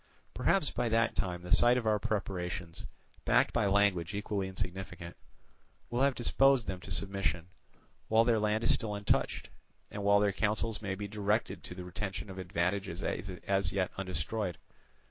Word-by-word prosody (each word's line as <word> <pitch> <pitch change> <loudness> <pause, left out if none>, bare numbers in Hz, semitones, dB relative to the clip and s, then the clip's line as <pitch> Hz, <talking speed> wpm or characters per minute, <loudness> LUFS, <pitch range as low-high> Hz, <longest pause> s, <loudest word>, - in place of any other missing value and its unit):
Perhaps 190 -7 +2
by 120 -1 -1
that 115 +1 +2
time 90 -2 -2
the 90 - -8
sight 120 +5 +5
of 120 - -2
our 105 -1 +3
preparations, 90 -4 -3 0.4
backed - - +3
by 115 -4 +2
language 100 -2 +2
equally 100 -2 -2
significant, 90 -2 -5 0.8
will 120 +2 0
have 140 -1 +3
disposed 135 0 +4
them 95 -1 -4
to 90 - -11
submission, 95 -3 -1 0.6
while 110 +1 +5
their 115 -2 +3
land 105 +1 +1
is 115 - +5
still 105 -2 -2
untouched, 100 0 0 0.4
and 100 - -5
while 100 0 +5
their 100 -1 +2
counsels 105 +1 0
may 95 -3 -2
be 100 +1 -5
directed 105 +2 -1
to 90 - -8
the 90 - -6
retention 95 +1 -5
of 95 - -8
advantages 90 +1 -2
as 95 -1 -1
yet 95 -1 0
undestroyed. 95 +1 -2
100 Hz, 165 wpm, -32 LUFS, 90-110 Hz, 0.8 s, sight